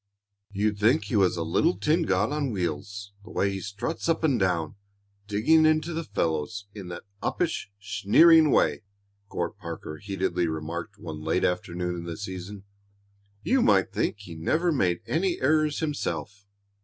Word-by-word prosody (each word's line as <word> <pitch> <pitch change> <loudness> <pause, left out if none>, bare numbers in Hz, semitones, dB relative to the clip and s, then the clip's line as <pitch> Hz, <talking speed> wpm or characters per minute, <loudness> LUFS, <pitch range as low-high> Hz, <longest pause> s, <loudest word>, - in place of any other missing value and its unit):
"You'd 105 +1 0
think 120 +9 +4
he 120 - -3
was 95 -4 +3
a 85 - -1
little 155 - +2
tin 160 +2 +1
god 100 +6 +1
on 145 -2 -1
wheels 100 +1 -4
the - - -13
way 100 - 0
he 95 - -4
struts 100 - -4
up 165 0 +1
and 140 -7 +3
down, 85 -5 0 0.5
digging 110 +11 +4
into 155 +2 +2
the 165 +1 -2
fellows 80 - -2
in 100 -4 -8
that 85 -1 -7 0.2
uppish, 170 - -1
sneering 105 - +5
way," 75 - +3 0.5
Court - - -3
Parker 75 - -7
heatedly 95 -2 -1
remarked 85 +5 -5
one 80 -6 -7 0.3
afternoon 90 0 -1
late - - -4
in - - -7
the 85 -1 -5
season. 95 0 -7 0.8
"You 265 0 +3
might 95 - +3
think - - 0
he 90 -4 -9
never 160 - +1
made 90 - +1
any 175 +3 0
errors 155 +2 +2
himself." 105 -9 -3
100 Hz, 160 wpm, -26 LUFS, -, 0.8 s, sneering